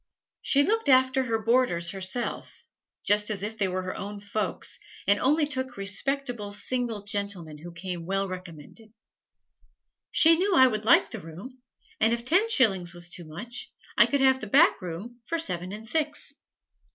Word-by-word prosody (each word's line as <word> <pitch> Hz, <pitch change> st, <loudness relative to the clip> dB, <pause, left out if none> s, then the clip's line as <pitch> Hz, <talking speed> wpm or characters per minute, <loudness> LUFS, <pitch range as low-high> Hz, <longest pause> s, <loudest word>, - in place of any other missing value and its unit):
She 285 Hz, 0 st, +4 dB
looked 445 Hz, 0 st, 0 dB
after 260 Hz, 0 st, +4 dB
her 230 Hz, -2 st, 0 dB
boarders 220 Hz, -6 st, +1 dB
herself, 195 Hz, +5 st, -3 dB, 0.4 s
just 210 Hz, +1 st, +3 dB
as 200 Hz, -2 st, -2 dB
if 215 Hz, +2 st, -4 dB
they 205 Hz, -3 st, 0 dB
were 185 Hz, 0 st, -3 dB
her 185 Hz, -, -5 dB
own 205 Hz, +1 st, -6 dB
folks, 205 Hz, 0 st, -3 dB, 0.3 s
and 200 Hz, +1 st, +3 dB
only 300 Hz, +3 st, +2 dB
took 260 Hz, -4 st, -4 dB
respectable 225 Hz, +2 st, -1 dB
single 225 Hz, 0 st, -3 dB
gentlemen 200 Hz, -7 st, -3 dB
who 175 Hz, +3 st, -10 dB
came 170 Hz, -1 st, -6 dB
well 195 Hz, +1 st, -1 dB
recommended. 185 Hz, +4 st, -10 dB, 1.2 s
She 325 Hz, 0 st, +6 dB
knew 380 Hz, +2 st, +1 dB
I 260 Hz, -, +7 dB
would 215 Hz, -4 st, -1 dB
like 230 Hz, -, +4 dB
the 225 Hz, -, -7 dB
room, 195 Hz, +11 st, -11 dB, 0.4 s
and 220 Hz, +1 st, +3 dB
if 235 Hz, 0 st, -3 dB
ten 375 Hz, -, +3 dB
shillings 190 Hz, -, +2 dB
was 175 Hz, 0 st, -5 dB
too 175 Hz, -, -7 dB
much 235 Hz, -, -7 dB, 0.2 s
I -, -, +6 dB
could 280 Hz, -1 st, 0 dB
have 265 Hz, -1 st, +3 dB
the 215 Hz, -, -6 dB
back 290 Hz, -, +4 dB
room 195 Hz, +8 st, -8 dB
for 335 Hz, -, -1 dB
seven 180 Hz, -, -1 dB
and 215 Hz, +2 st, -8 dB
six. 300 Hz, +1 st, -2 dB
215 Hz, 170 wpm, -26 LUFS, 190-260 Hz, 1.2 s, I